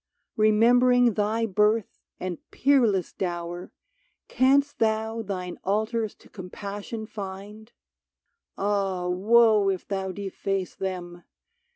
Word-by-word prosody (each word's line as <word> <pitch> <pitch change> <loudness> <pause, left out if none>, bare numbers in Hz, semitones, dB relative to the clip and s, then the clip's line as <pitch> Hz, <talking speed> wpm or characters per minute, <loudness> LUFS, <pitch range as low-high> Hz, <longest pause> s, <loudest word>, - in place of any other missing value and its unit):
Remembering 240 +3 +4
thy 215 +3 0
birth 210 +1 +1 0.2
and 180 -2 -4
peerless 235 -10 +2
dower, 175 -1 -4 0.6
Canst 275 +3 +2
thou 220 0 0
thine 185 -4 -5
altars 220 +2 -1
to - - -20
Compassion 200 +3 -7
find? 210 +2 -8 0.9
Ah, 195 -3 -1
woe 210 +2 +4
if 190 -2 -3
thou 190 -1 -3
deface 195 -1 -3
them 175 -2 -5
205 Hz, 95 wpm, -26 LUFS, 190-225 Hz, 0.9 s, Remembering